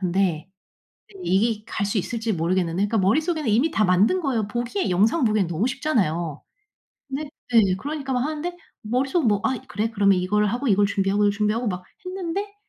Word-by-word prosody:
근데 180 -3 0 0.8
이게 215 - +1
갈 205 - -2
수 200 +2 -1
있을지 225 +3 -2
모르겠는데. 170 0 0
그러니까 225 - 0
머릿속에는 300 - +1
이미 250 +10 +2
다 215 -8 +2
만든 195 - +3
거예요. 235 - -1
보기에 240 - -2
영상 215 - +2
보기엔 215 -5 +2
너무 170 +6 -1
쉽잖아요. 190 - -1 0.7
네 280 +2 -4 0.2
네. 230 -2 +7 0.2
그러니까 285 0 -4
막 250 - +1
하는데 310 +5 -3 0.3
머릿속은 260 +6 0
뭐 205 -2 +2
'아, 260 -1 +1
그래. 220 +2 -2
그러면 200 -3 +3
이걸 210 +4 +1
하고 240 +6 -1
이걸 205 0 +4
준비하고 200 +1 +1
이걸 205 - +4
준비하고.' 215 +3 0
막 180 -2 -3 0.2
했는데 380 +2 -4
220 Hz, 405 characters per minute, -23 LUFS, 195-270 Hz, 0.8 s, 네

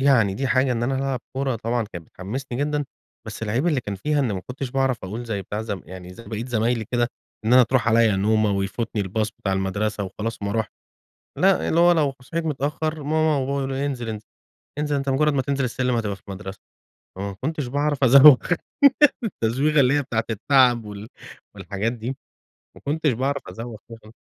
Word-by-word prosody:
يعني 120 -8 +4
دي 135 +6 -2
حاجة 130 0 +2
إن 115 - -2
أنا 130 +3 0
ألعب 135 -2 -1 0.2
كورة 135 -3 0
طبعًا 115 +2 -1
كان 85 -2 -7
بتحمسني 120 - -6
جدًا، 145 +1 0 0.4
بس 110 +1 -7
العيب 115 +9 0
اللي 150 -6 +2
كان 105 -2 -5
فيها 145 +10 0
إن 125 -6 0
ما 95 - -3
كنتش 130 0 -5
باعرف 130 -5 0
أقول 110 +6 -5
زي 105 -4 -3
بتاع 105 +4 -4
ز 110 -2 -3
يعني 90 +1 -10
زي 115 - -12
باقية 110 +1 -5
زمايلي 115 -1 0
كده، 120 -1 +2 0.4
إن 110 - +2
أنا 125 0 +8
تروح 120 0 +1
عليّا 115 -3 +4
نومة 110 +2 +2
ويفوتني 100 +3 -2
الباص 105 +3 -1
بتاع 95 - -3
المدرسه 100 +2 -1
وخلاص 110 +3 -5
وما 100 - -1
اروحش. 110 +1 -1 0.7
لأ، 190 0 +3
اللي 165 - +2
هو 175 0 +6
لو 150 -5 +2
صحيت 165 +6 -4
متأخر 155 +1 -2
ماما 155 +1 +2
وبابا 135 - 0 0.2
يقولوا 135 0 -2
لي: 140 - -1
"انزل 125 -5 -3
انز 110 -1 -5 0.6
انزل 150 -1 0
أنت 140 -1 -1
مجرد 150 +3 +2
ما 135 - +1
تنزل 140 0 -1
السلم 125 0 -1
هتبقى 105 -4 -1
في 95 - -20
المدرسة." 95 -1 -7 0.6
فما 100 0 -4
كنتش 150 -1 -2
باعرف 145 +1 0
أزوغ 135 +2 +9 0.9
التزويغة 140 - +1
اللي 130 +1 +4
هي 145 - +2
بتاعة 115 -4 -2
التعب 120 +1 +3
وال 105 +1 -8 0.5
والحاجات 100 +4 -3
دي. 125 +3 -5 0.6
ما - - -15
كنتش 155 +1 +1
باعرف 135 +4 -1
أزوغ 115 +5 -7
اهم. 110 -1 -12
120 Hz, 195 wpm, -23 LUFS, 105-140 Hz, 0.9 s, أزوغ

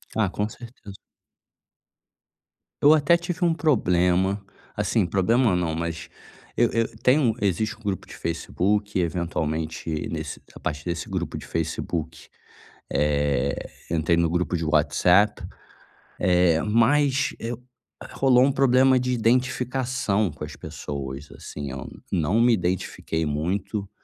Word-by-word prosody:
Ah, 110 -4 +2
com 105 +2 -2
certeza. 115 -5 -11 1.9
Eu 145 +2 +8
até 155 +3 +4
tive 175 +1 -2
um 170 - +3
problema, 95 - +2 0.3
assim, - - +1
problema 105 +3 +2
não, 85 -3 0
mas 85 0 -4 0.5
eu 120 -1 +4
eu 115 -1 -1
tem 130 +4 +4
um 125 -7 +2
existe 100 +3 0
um 115 - -22
grupo 100 -3 -3
de - - -12
Facebook, 100 +4 -1
eventualmente 80 -2 -2 0.2
nesse - - -5
a - - -12
partir 75 -1 -4
desse 85 -1 -3
grupo - - -3
de - - -9
Facebook, 80 0 -4 0.6
eh, 70 -1 0 0.2
entrei 85 0 +1
no 85 -1 +2
grupo 90 +1 0
de 80 - -3
WhatsApp. 90 +7 +3 0.8
Eh, 90 -3 +3
mas, 135 +6 +2
eh, 115 +1 -3 0.6
rolou 130 -2 +4
um 140 - +3
problema 130 0 +4
de 125 0 -1
identificação 125 - 0
com 70 - -10
as 75 - -9
pessoas, 70 0 -6
assim, 70 -2 -7
eu 65 -1 -6 0.2
não 95 +5 +1
me 120 +1 +5
identifiquei 90 -4 -1
muito. 95 +7 -2
95 Hz, 130 wpm, -24 LUFS, 80-120 Hz, 1.9 s, Eu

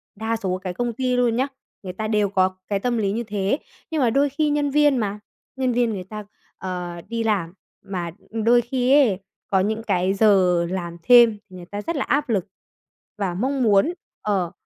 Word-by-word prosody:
đa 220 +2 -2
số 190 -4 -2
cái 185 -2 -3
công 240 +5 -2
ty 255 +1 0
luôn 240 -2 +2
nhé, 260 +3 +1 0.4
người 185 -1 -6
ta 215 +3 -3
đều 210 -2 +1
có 185 -1 +1
cái 200 -1 0
tâm 240 +3 -1
lý 200 -3 0
như 230 +3 -2
thế, 205 +2 -1 0.3
nhưng 315 -2 0
mà 245 - +4
đôi 280 +5 +2
khi 295 +2 0
nhân 290 0 +1
viên 295 -1 +4
mà, 210 -3 -2 0.4
nhân 260 -2 0
viên 240 -1 +2
người 190 -3 -5
ta, 210 +2 -8 0.3
ờ, 180 -2 -5
đi 230 +1 -2
làm, 195 -7 0 0.3
mà 175 -3 -4 0.2
đôi 230 +2 +3
khi 250 +2 +1
ấy 195 -4 -2 0.3
có 190 - +2
những 215 +4 -1
cái 190 -3 +1
giờ 190 -4 +4
làm 175 -2 -4
thêm, 240 -3 +7
người 180 -1 -10
ta 205 +3 -6
rất 335 +10 -3
là 285 - 0
áp 285 -1 0
lực 200 -5 0 0.7
và 195 -4 -1
mong 260 +6 0
muốn 215 - +4 0.3
ờ, 190 -5 0
215 Hz, 205 wpm, -23 LUFS, 190-245 Hz, 0.7 s, thêm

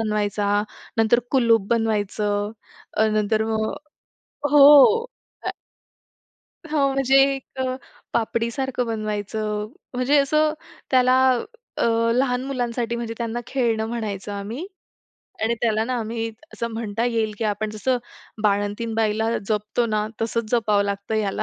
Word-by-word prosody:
बनवायचा, 205 -1 0 0.3
नंतर 225 +2 +4
कुलूप 230 -6 +3
बनवायचं, 210 -2 0 0.4
अ, 220 +1 +2
नंतर 215 +1 +1
मग 220 0 -1 0.8
हो. 295 - +8 1.6
हो. 285 -3 +1
म्हणजे 270 0 +3 0.2
एक 265 0 -9 0.5
पापडीसारखं 235 +2 -1
बनवायचं, 215 -1 -3 0.3
म्हणजे 260 +4 +3
असं 305 +2 +3 0.4
त्याला 255 0 +4 0.6
अ, - - +3 0.3
लहान 250 0 +1
मुलांसाठी, 240 -3 -2
म्हणजे 230 -1 -4
त्यांना 235 0 -2
खेळणं 230 -4 0
म्हणायचं 210 -4 -4
आम्ही 220 - -5 0.8
आणि 230 +1 +2
त्याला 220 -1 +2
ना 255 +1 -2
आम्ही, 225 +1 -3 0.3
असं 235 - -3
म्हणता 225 0 -2
येईल 225 -3 0
की 225 - -2
आपण 210 0 -1
जसं 245 +4 0 0.4
बाळंतीण 205 +2 0
बाईला 220 0 +1 0.2
जपतो 215 +2 0
ना, 215 -1 0 0.2
तसंच 230 -1 -2
जपावं 215 -4 +2
लागतं 200 +2 -3
ह्याला, 205 -3 0
225 Hz, 120 wpm, -23 LUFS, 210-245 Hz, 1.6 s, हो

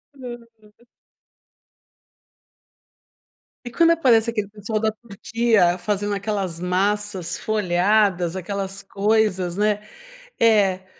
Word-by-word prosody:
Aham. 235 -3 -12 2.8
E 245 - -6
quando 335 +5 +4
aparece 245 -9 +3
aquele 210 -3 -3
pessoal 215 +1 -4
da 220 0 +1
Turquia 215 -3 0
fazendo 205 +2 -2
aquelas 195 -4 -3
massas 195 +1 -1
folhadas 190 -3 +1
aquelas 195 +1 -4
coisas, 200 -3 0
né? 210 +1 +1 0.6
É, 200 -5 +3
205 Hz, 85 wpm, -22 LUFS, 190-220 Hz, 2.8 s, quando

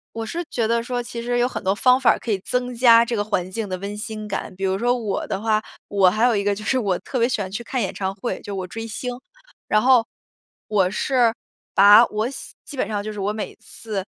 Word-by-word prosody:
我 225 0 -3
是 340 +10 -4
觉 230 -3 0
得 230 +1 +1
说， 245 +1 -3
其 235 0 -6
实 245 +1 -1
有 245 0 +3
很 255 - -6
多 190 0 +2
方 250 +4 +4
法 255 - +5
儿 - - +4
可 230 - -4
以 200 - 0
增 250 0 -2
加 235 -1 +6
这 235 0 -2
个 205 - 0
环 185 -4 -2
境 215 0 -4
的 185 - -3
温 200 +2 -6
馨 215 0 -6
感。 195 -1 -4
比 190 - -7
如 190 0 +1
说 245 +4 +1
我 215 -5 -3
的 190 - -2
话， 215 0 +1 0.3
我 195 -2 +4
还 215 +6 +2
有 245 -2 +3
一 200 - 0
个 205 0 +1
就 215 - -8
是 260 +4 +1
我 195 -6 0
特 255 - -4
别 235 +1 +3
喜 240 - -1
欢 190 -1 -5
去 205 +4 -4
看 255 +2 -3
演 195 - -2
唱 190 -1 -3
会， 240 +3 -3
就 - - -16
是 205 - -5
我 185 - -5
追 225 +4 -6
星。 250 +3 -4 0.6
然 215 - +3
后， 250 -2 +5 0.6
我 195 -4 +2
是 240 +3 +2 0.4
把 205 +3 +8
我 215 +2 -2
喜 275 - -9
基 - - -8
本 260 - -1
上 205 -2 -3
就 215 +1 -5
是 210 - -7
我 200 +1 0
每 215 0 -5
次， 210 -4 -6
220 Hz, 290 characters per minute, -22 LUFS, 200-240 Hz, 0.6 s, 把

